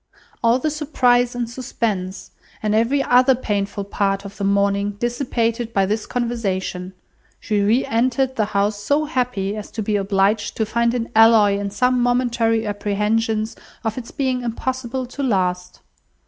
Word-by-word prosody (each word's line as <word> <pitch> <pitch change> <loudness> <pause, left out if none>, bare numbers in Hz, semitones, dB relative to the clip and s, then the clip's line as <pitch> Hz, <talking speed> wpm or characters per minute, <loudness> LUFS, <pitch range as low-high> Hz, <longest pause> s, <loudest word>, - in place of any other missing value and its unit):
All 230 +1 +4
the 305 +4 -1
surprise 250 -5 +2
and 240 -1 -2
suspense, 225 -6 -4 0.3
and 210 -1 +1
every 235 +6 +2
other 255 +1 +5
painful 205 -4 -2
part 195 0 -1
of 200 - -9
the 200 - -4
morning 200 +1 +1
dissipated 240 -1 -1
by 195 -1 +3
this 210 +2 -2
conversation, 195 -6 -2 0.5
she 210 -2 0
re 220 +6 +2
entered 260 +1 +1
the 215 - +1
house 205 0 0
so 290 +7 +1
happy 245 -8 -1
as 210 -1 -7
to 220 - -4
be 210 0 0
obliged 200 +1 +1
to 220 - +1
find 235 +2 +1
an 235 -1 -2
alloy 220 -3 +6
in 200 0 -3
some 250 +5 +1
momentary 235 -2 +1
apprehensions 215 +2 -1 0.3
of 220 -2 -2
its 245 -2 -7
being 260 -3 -1
impossible 255 +2 -3
to 255 +3 -7
last. 180 -7 -1
225 Hz, 155 wpm, -21 LUFS, 205-245 Hz, 0.5 s, alloy